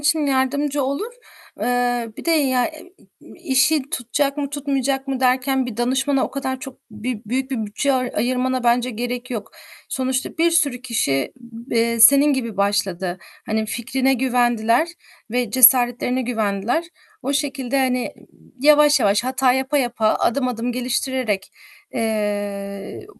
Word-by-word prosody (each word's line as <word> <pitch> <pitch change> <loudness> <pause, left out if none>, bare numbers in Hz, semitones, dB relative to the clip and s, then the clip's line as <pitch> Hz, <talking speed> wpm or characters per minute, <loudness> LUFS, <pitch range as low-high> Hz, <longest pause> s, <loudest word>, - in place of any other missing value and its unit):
için 295 +1 +2
yardımcı 280 +1 0
olur. 280 - -3 0.5
Eee, 245 -1 0
bir - - -9
de 335 - +1
ya, 265 -6 +2
ı - - -1 0.5
i - - -15
işi 300 -1 +2
tutacak 280 -1 -1
mı 285 -2 -3
tutmayacak 275 -1 -2
mı 265 -1 -2
derken 260 +1 +2
bir 240 -4 -6
danışmana 265 +3 +1
o - - -5
kadar 260 -1 -4
çok 270 -3 -9
bir 215 +1 -5
büyük 260 +4 -2
bir 225 -5 -2
bütçe 275 +7 0
ay 255 -1 0
ayırmana 255 +1 0
bence 240 +1 +2
gerek 245 +2 -4
yok. 225 -4 -5 0.4
Sonuçta 260 +3 -2
bir 335 +1 +4
sürü 285 -7 +1
kişi, 140 - -1
b 235 -1 -7
eee, 230 0 +1
senin 280 +5 +7
gibi 230 -6 -3
başladı. 190 -3 -1 0.3
Hani, 220 0 -1
fikrine 260 +4 0
güvendiler 245 +2 +2 0.4
ve 245 -1 -1
cesaretlerine 250 +1 +5
güvendiler. 225 +4 -1 0.4
O 275 - -1
şekilde, 275 -2 -1
hani, 255 -2 0
ııı, - - -19 0.3
yavaş 295 0 +5
yavaş, 205 +1 +2
hata 260 0 +2
yapa 265 +3 0
yapa, 240 -4 0
adım 255 +1 +1
adım 245 0 -3
geliştirerek, 250 -4 -2 0.4
eee, 205 - -3
255 Hz, 145 wpm, -21 LUFS, 230-270 Hz, 0.5 s, senin